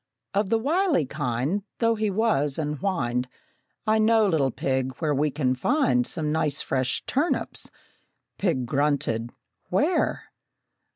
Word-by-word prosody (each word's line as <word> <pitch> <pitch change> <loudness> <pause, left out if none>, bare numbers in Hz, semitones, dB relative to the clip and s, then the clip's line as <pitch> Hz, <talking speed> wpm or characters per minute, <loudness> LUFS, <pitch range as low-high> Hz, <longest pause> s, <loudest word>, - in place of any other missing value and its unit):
Of 200 0 +1
the 225 - +3
wily 305 - +2
kind, 140 - -1 0.2
Though, 230 -1 +3
he 215 -1 0
was, 190 -10 +1
and 150 -1 -2
he - - -16
whined, 125 -11 -1 0.6
"I 220 0 +3
know, 220 0 +4
little 155 -7 +2
pig, 130 +1 -1
where 155 -3 0
we 150 +2 +1
can 135 -3 0
find 250 - +2
Some 150 -2 -2
nice 150 -2 0
fresh 130 -1 -1
turnips!" 295 +6 -1 0.7
Pig 165 -10 +1
grunted, 135 -4 0 0.4
"Where?" - - +1
155 Hz, 135 wpm, -25 LUFS, 135-220 Hz, 0.7 s, know